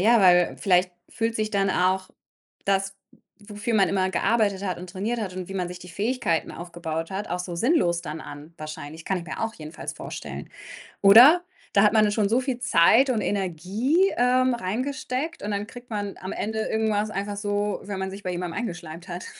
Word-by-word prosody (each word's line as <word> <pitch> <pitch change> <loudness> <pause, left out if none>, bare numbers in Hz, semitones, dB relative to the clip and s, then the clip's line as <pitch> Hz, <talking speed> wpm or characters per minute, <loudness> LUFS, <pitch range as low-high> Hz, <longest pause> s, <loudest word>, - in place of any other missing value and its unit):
Ja, 225 +3 +5
weil 180 -2 +5
vielleicht 180 -1 +2 0.2
fühlt 225 0 -1
sich 215 0 -1
dann 195 -1 +1
auch 185 +1 +1 0.6
das, 195 0 0 0.4
w 205 0 -12
wofür 215 +3 -2
man 195 -4 +4
immer 190 -1 +1
gearbeitet 200 -1 +1
hat 185 -2 -2
und 180 +1 -9
trainiert 210 +6 -2
hat 190 -4 -4
und 185 -1 -5
wie - - -6
man 180 -2 -2
sich 180 - -8
die 180 0 -12
Fähigkeiten 210 -5 -1
aufgebaut 165 -1 -5
hat, 195 +2 -4
auch 180 - -2
so 180 -1 -5
sinnlos 175 - +2
dann 155 -1 -6
an 145 +3 -10
wahrscheinlich. 155 +1 -8
Kann 190 - 0
ich 170 - -8
mir - - -5
auch 225 0 -1
jedenfalls 155 +1 -7
vorstellen, - - -7 0.5
oder? 250 - +9 0.3
Da 200 - +6
hat 210 - +5
man 215 -1 +5
nun 205 - 0
schon 205 -1 +1
so 240 +3 +3
viel 255 -1 -2
Zeit 245 +4 +5
und 230 -4 +1
Energie, 205 - +1
ähm, 250 +1 +3
reingesteckt 255 - -3
und 210 - -3
dann 205 +1 -2
kriegt 245 +1 -12
man 205 -2 -3
am 185 - -6
Ende 220 +1 -3
irgendwas 215 -1 0
einfach 205 0 -3
so, 205 0 -1
wenn 200 -1 -5
man 190 0 -3
sich 195 +1 -9
bei 185 - -3
jemandem 175 0 -4
eingeschleimt 175 -5 -6
hat. 175 0 -6
200 Hz, 205 wpm, -25 LUFS, 180-225 Hz, 0.6 s, oder